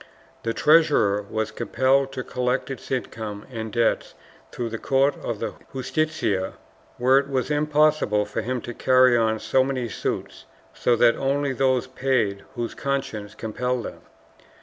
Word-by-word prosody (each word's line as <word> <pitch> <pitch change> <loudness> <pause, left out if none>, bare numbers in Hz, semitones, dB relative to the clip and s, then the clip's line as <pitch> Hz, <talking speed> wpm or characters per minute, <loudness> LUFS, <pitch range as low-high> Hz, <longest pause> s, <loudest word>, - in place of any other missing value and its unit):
The 115 - -1
treasurer 150 -10 +4
was 110 0 -2
compelled 135 +1 +1
to 130 - -4
collect 125 +2 -1
its 130 - -8
income 110 -5 -4
and 110 -2 -5
debts 115 +1 0 0.4
through 120 -2 -3
the 115 0 -5
court 135 +1 +2
of 115 - -3
the - - -4 0.2
Justicia, 130 -8 -1 0.4
where 130 +2 +5
it 140 0 -4
was 135 +1 -1
impossible 150 -7 +2
for 105 +2 -3
him 125 +2 -3
to 120 - -6
carry 130 0 +4
on 110 -1 +2
so 130 +4 +2
many 130 -2 -2
suits, - - -4 0.3
so 120 - +2
that 120 0 +4
only 140 0 0
those 130 -1 +2
paid 125 -7 0
whose 120 -1 -3
consciences 110 -7 -3
compelled 125 +2 -2
them. - - -8
125 Hz, 150 wpm, -24 LUFS, 110-135 Hz, 0.4 s, where